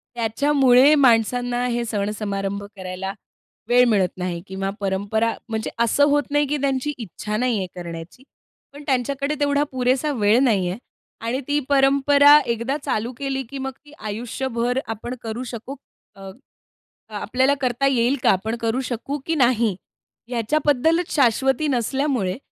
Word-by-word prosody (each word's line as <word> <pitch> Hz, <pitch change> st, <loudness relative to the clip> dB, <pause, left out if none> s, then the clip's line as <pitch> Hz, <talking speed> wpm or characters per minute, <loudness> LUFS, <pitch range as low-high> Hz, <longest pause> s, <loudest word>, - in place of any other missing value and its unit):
त्याच्यामुळे 260 Hz, +3 st, +4 dB
माणसांना 245 Hz, -1 st, +2 dB
हे 240 Hz, -1 st, -1 dB
सण 205 Hz, -3 st, -2 dB
समारंभ 200 Hz, -1 st, -3 dB
करायला 185 Hz, 0 st, -5 dB, 0.6 s
वेळ 245 Hz, +1 st, +6 dB
मिळत 200 Hz, -5 st, +2 dB
नाही 180 Hz, -2 st, -3 dB
किंवा 190 Hz, 0 st, -3 dB
परंपरा 205 Hz, +3 st, 0 dB, 0.2 s
म्हणजे 220 Hz, -1 st, -3 dB
असं 235 Hz, +5 st, +2 dB
होत 290 Hz, 0 st, +3 dB
नाही 290 Hz, 0 st, +2 dB
की 295 Hz, +2 st, -1 dB
त्यांची 275 Hz, +1 st, -1 dB
इच्छा 210 Hz, -1 st, -5 dB
नाहीये 235 Hz, -5 st, 0 dB
करण्याची, 170 Hz, +5 st, -8 dB, 0.5 s
पण 290 Hz, +1 st, -11 dB
त्यांच्याकडे 275 Hz, +2 st, -1 dB
तेवढा 285 Hz, 0 st, +2 dB
पुरेसा 260 Hz, +3 st, +1 dB
वेळ 215 Hz, -1 st, +3 dB
नाही 200 Hz, -8 st, +2 dB
आहे. 180 Hz, -, -4 dB, 0.5 s
आणि 240 Hz, +3 st, -1 dB
ती 290 Hz, 0 st, +1 dB
परंपरा 280 Hz, +1 st, +6 dB
एकदा 235 Hz, +4 st, -1 dB
चालू 225 Hz, +3 st, -1 dB
केली, 270 Hz, -1 st, -3 dB
की 265 Hz, +3 st, -9 dB
मग 265 Hz, 0 st, -4 dB
ती 295 Hz, -, -16 dB
आयुष्यभर 235 Hz, +3 st, -2 dB
आपण 225 Hz, +3 st, -5 dB
करू 225 Hz, +2 st, -4 dB
शकू 240 Hz, +4 st, -7 dB, 0.4 s
अ 195 Hz, -1 st, -10 dB, 0.9 s
आपल्याला 260 Hz, +7 st, +1 dB
करता 255 Hz, +1 st, +1 dB
येईल 255 Hz, 0 st, +2 dB
का? -, -, +4 dB
आपण 220 Hz, +5 st, -1 dB
करू 230 Hz, +3 st, 0 dB
शकू 255 Hz, +4 st, -3 dB
की 325 Hz, -, 0 dB
नाही? 240 Hz, -, +2 dB, 0.5 s
याच्याबद्दलच 295 Hz, +7 st, +1 dB
शाश्वती 265 Hz, +2 st, +2 dB
नसल्यामुळे 255 Hz, -5 st, 0 dB
245 Hz, 140 wpm, -22 LUFS, 215-275 Hz, 0.9 s, वेळ